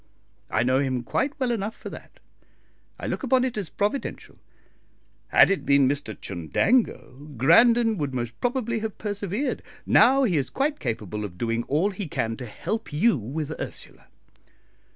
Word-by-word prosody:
I - - +1
know 130 +1 +2
him 130 -3 -1
quite 280 - -1
well 255 -2 +1
enough 220 -1 -2
for - - -9
that. - - -12 0.8
I - - -6
look - - -2
upon 260 -2 +2
it 255 - -3
as 205 -6 -3
providential. 210 +7 -3 0.9
Had - - +6
it 195 - 0
been 140 -1 +4
Mr 140 -7 -3
Chundango, 140 - -1
Grandon 225 - +5
would 145 -2 -1
most 120 -2 -3
probably 240 -2 0
have 220 -1 -5
persevered. 205 +5 -2 0.2
Now 270 +1 +5
he 190 -10 +2
is 135 -2 -1
quite 290 +2 -1
capable 105 -4 -3
of 90 -4 -7
doing 115 +2 -1
all 160 +9 +1
he 195 -1 -5
can 115 -5 -2
to 125 - -7
help 220 - -4
you 170 +9 +3
with 140 +6 -4
Ursula." - - -9
170 Hz, 160 wpm, -25 LUFS, -, 0.9 s, Had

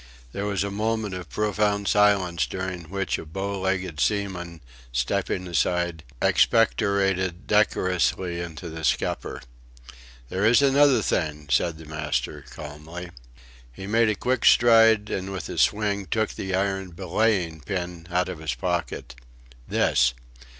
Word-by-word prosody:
There 100 +8 -3
was 100 -1 0
a 100 - -3
moment 110 0 -1
of 90 -4 -7
profound 105 -1 0
silence 100 -5 +3
during 95 -2 -5
which 95 +3 -2
a - - -6
bow 95 +4 -4
legged 95 -4 -2
seaman, 90 -4 -1 0.3
stepping - - -1
aside, 85 -1 0 0.2
expectorated 100 -5 +2
decorously 90 -4 +1
into 85 0 -6
the 80 0 -7
scupper. 70 - -1 0.9
"There 95 +2 -2
is 115 +5 +5
another 140 -4 +5
thing," 75 -3 -2
said 80 +5 +2
the 80 - -12
master, 75 -5 -3
calmly. 80 +4 -9 0.6
He 80 +10 -9
made 115 +2 +3
a 105 - +1
quick 125 +4 -1
stride 115 -3 +6
and 95 +1 -3
with 95 -4 -5
a - - -3
swing 100 -2 +1
took 110 -1 -1
an 95 -1 -2
iron 95 -1 -1
belaying 90 -3 0
pin 90 -3 -4
out 90 0 +1
of 90 -4 -6
his 80 0 -3
pocket. 85 -10 -3 0.5
"This!" 60 0 +2
95 Hz, 135 wpm, -25 LUFS, 85-105 Hz, 0.9 s, stride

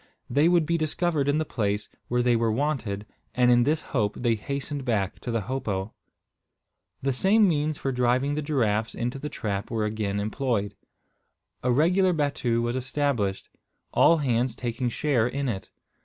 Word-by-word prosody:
They 145 +6 +4
would 175 -3 +3
be 170 +1 0
discovered 155 -2 0
in 145 - +2
the 155 - 0
place 105 -5 -1 0.2
where 125 0 +1
they 120 -1 +3
were 115 -1 +1
wanted; 115 -6 -1 0.3
and 125 -1 +4
in 120 0 +5
this 155 +2 +1
hope 105 -6 +1
they 120 -2 +1
hastened 140 +5 -4
back 105 -6 -1
to - - -7
the 115 -1 0
hopo. 105 -4 -3 1.1
The 135 0 +1
same 200 - +4
means 155 -2 0
for 135 - -2
driving 125 +3 +1
the 150 - -1
giraffes 115 -8 0
into 120 +3 -3
the 150 +2 -4
trap 100 -5 -3
were 110 -2 -1
again 105 -2 -2
employed. 105 -1 -1 0.9
A 125 - +1
regular 180 +7 +3
battue 130 -6 0
was 120 +1 -1
established, 130 -7 -1 0.5
all 165 - +5
hands 125 -4 0
taking 120 +1 -2
share 120 -2 +1
in 140 +2 -2
it. 100 -6 -4
125 Hz, 170 wpm, -26 LUFS, 110-145 Hz, 1.1 s, in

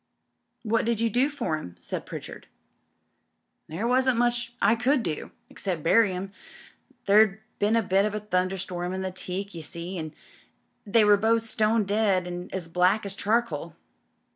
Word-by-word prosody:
"What 225 0 +1
did 230 -2 0
you 230 -1 +1
do 255 +6 +2
for 235 - -2
'em?" 90 - -10
said - - -5
Pritchard. - - -8 1.2
"There 170 +9 -4
wasn't 255 0 +3
much 240 0 0
I 205 +2 +4
could 245 +3 +1
do, 155 -4 -4 0.2
except 180 -6 -4
bury 205 +4 +4
'em. 185 +2 -5 0.7
There'd 210 0 +5 0.2
been 210 +2 +2
a 230 - +3
bit 195 +1 +2
of 210 0 -2
a - - -1
thunderstorm 185 -2 -2
in 190 - -3
the 190 - -3
teak, 185 +2 -5
you 165 - -6
see, 170 +4 -6
and 155 -1 -6 0.7
they 215 +1 +4
were 205 0 +6
both 225 +2 +2
stone 220 0 +1
dead 200 -2 +1
and 180 0 -6
as 185 -3 -4
black 180 +5 +2
as 200 - -2
charcoal. 230 +4 -1
200 Hz, 165 wpm, -26 LUFS, 180-230 Hz, 1.2 s, were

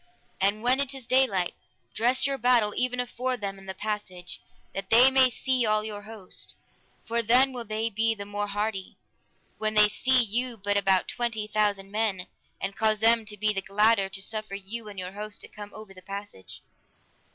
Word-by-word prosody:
And 200 +3 +1
when 255 +2 +4
it 275 -1 0
is 265 -3 -9
daylight, 230 -9 +2 0.4
dress 250 +3 +2
your 275 -1 -1
battle 235 -3 +3
even 250 0 -1
afore 250 +1 -2
them 195 -3 -5
and 195 0 -12
the 190 - -5
passage, 190 -4 -4 0.3
that 195 0 -5
they 245 +4 +7
may 265 -1 +6
see 255 +1 0
all 215 -1 +2
your 210 -1 -5
host, 210 -3 -9 0.5
for 235 +1 +2
then 250 +4 +4
will 240 -2 -4
they 215 +1 -2
be 225 +2 +1
the 200 -1 -7
more 205 0 -3
hardy, 205 -1 -3 0.6
when 215 0 -1
they 210 0 +7
see 255 +3 +3
you 235 +2 -1
but 205 0 -1
about 195 -2 +3
twenty 230 -3 -2
thousand 205 -2 0
men, 205 -4 -1 0.3
and 195 0 -4
cause 220 -1 +2
them 225 +1 +4
to 210 -1 -7
be 210 +1 +1
the 195 - -2
gladder 200 +1 +3
to 195 0 -7
suffer 215 -1 -2
you 210 +3 -5
and 200 - -11
your 180 0 -4
host 210 +1 -6
to - - -7
come 205 -1 -10
over 215 -2 -11
the 185 - -14
passage. 200 - -9
215 Hz, 195 wpm, -27 LUFS, 200-235 Hz, 0.6 s, they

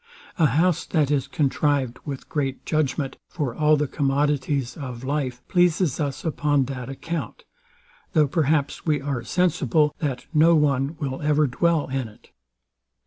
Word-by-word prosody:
A 160 - +6
house, 165 +6 +2
that 150 -4 +1
is 140 -2 +1
contrived 140 -3 0
with 140 -3 -6
great 135 -3 -3
judgment 140 -3 -1
for 145 -8 -3
all 155 +2 +3
the 145 0 0
commodities 140 -2 0
of 130 -4 -7
life, 130 -3 -3
pleases 175 -4 +2
us 145 0 -3
upon 145 -3 +1
that 130 -1 -6
account; 165 +5 -5 0.7
though 155 -3 +4
perhaps 145 -1 0
we 150 -3 +1
are 135 -3 -3
sensible, 155 -2 +1
that 140 -6 -3
no 165 +2 +5
one 145 0 +1
will 135 -4 -3
ever 150 0 +3
dwell 160 +4 +1
in 130 -2 -2
it. 105 - -19
145 Hz, 145 wpm, -24 LUFS, 135-155 Hz, 0.7 s, A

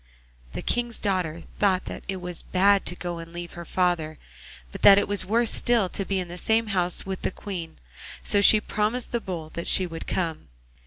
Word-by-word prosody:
The - - -5
King's 240 -1 -1
daughter 180 -5 -1 0.2
thought 190 -3 +2
that - - -7
it 195 - -2
was 180 -2 -4
bad 200 +2 +2
to 180 - -4
go 175 -1 -5
and 165 0 -9
leave 175 0 -7
her 170 0 -8
father, 170 -4 0 0.5
but - - -9
that 200 -1 +9
it 200 - +2
was 200 -2 +2
worse 230 +2 +2
still 230 -6 +2
to 195 - -3
be 195 - -1
in 180 -1 -2
the 175 +1 -8
same 220 +2 +1
house 180 -1 0
with 190 -1 -5
the - - 0
Queen, 180 -4 -7 0.5
so 205 - +2
she 215 +1 +7
promised 215 +4 -2
the 235 - -1
Bull 165 -6 -6
that 170 - -4
she 185 - +4
would 165 -2 -7
come. 165 -4 -2
185 Hz, 210 wpm, -25 LUFS, 175-205 Hz, 0.5 s, that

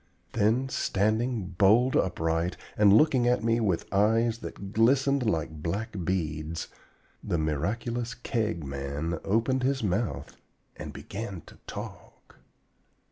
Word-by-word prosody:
Then, 115 +4 +2
standing 110 -2 0
bold 115 +6 +5
upright, 80 -1 0 0.2
and 105 -1 +5
looking 125 +2 +5
at 125 -1 +2
me 115 +1 +2
with 95 -7 0
eyes 110 +3 +3
that 100 -3 -8
glistened 130 +2 +3
like 80 -3 -2
black 100 +8 -2
beads, 80 -2 -2 0.5
the 85 - -1
miraculous 115 - -2
Keg 110 - -2
Man 70 +4 -3
opened 115 +6 +1
his 135 -1 0
mouth 90 - -2 0.4
and - - -7
began 100 -4 -6
to - - -17
talk! - - -9
105 Hz, 120 wpm, -28 LUFS, 85-120 Hz, 0.5 s, bold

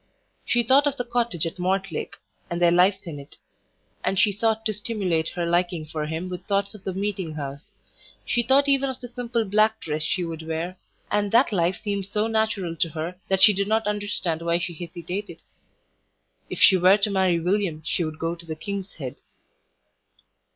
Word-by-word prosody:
She 240 -1 +2
thought 270 +5 +5
of 285 -1 -1
the 245 - -2
cottage 235 -9 0
at 165 +2 -5
Mortlake, 190 -1 -2 0.3
and 170 - -2
their 175 -1 +5
lives 185 +3 +3
in 155 -4 -6
it; 140 - -13 0.7
and 195 - 0
she 205 +2 +5
sought 220 +2 0
to 215 - +1
stimulate 195 -6 -1
her 175 -1 -3
liking 175 -1 0
for 155 0 -4
him 160 +3 -3
with 180 -1 -6
thoughts 200 0 0
of 210 -3 -12
the 190 - -2
meeting 190 -5 -2
house; 140 0 -6 0.5
she 240 - +1
thought 265 +4 +4
even 275 -1 +3
of 260 - -5
the 245 - -7
simple 240 -1 -2
black 215 +2 +3
dress 155 -1 -2
she 180 +3 0
would 165 -1 -5
wear, 165 +3 -3 0.4
and 205 -1 +1
that 235 +2 +5
life 175 0 +2
seemed 200 -3 -3
so 210 +2 0
natural 220 -6 0
to 165 - +2
her 160 +3 -5
that 190 0 +2
she 210 - +9
did 200 +1 -1
not 220 0 +1
understand 205 -5 -1
why 170 0 +1
she 175 0 -3
hesitated.... 175 +4 -6 1.1
If - - -5
she 190 - +7
were 185 +3 +6
to 205 0 0
marry 190 -3 +2
William 175 -3 0
she 175 - 0
would 155 -1 -4
go 165 +1 -1
to 170 0 -11
the 160 - -4
"King's 200 +3 -5
Head." 135 -3 -6
190 Hz, 195 wpm, -25 LUFS, 170-210 Hz, 1.1 s, she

